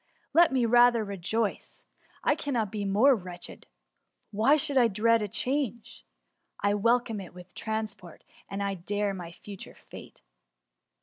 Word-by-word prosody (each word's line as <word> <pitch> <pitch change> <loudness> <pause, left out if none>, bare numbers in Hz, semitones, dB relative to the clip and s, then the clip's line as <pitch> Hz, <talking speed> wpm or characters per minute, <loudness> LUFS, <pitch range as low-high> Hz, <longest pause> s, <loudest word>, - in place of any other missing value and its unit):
Let 335 0 +6
me 255 -3 +2
rather 240 0 +5
rejoice* 200 +2 -3 0.4
I - - +4
cannot 250 -9 -2
be 210 -2 -3
more 215 +8 +5
wretched; 180 -4 -9 0.6
why 225 +8 +4
should 290 -1 0
I 250 -3 +6
dread 225 +2 +2
a 210 - -1
change? 250 0 -3 0.6
I 205 0 +1
welcome 230 0 +1
it 180 - -12
with 180 0 -13
transport, 215 -6 -5 0.3
and 195 -2 -3
dare 205 +2 0
my 175 -3 -7
future 195 +3 -10
fate.'' - - -13
215 Hz, 135 wpm, -28 LUFS, 200-240 Hz, 0.6 s, Let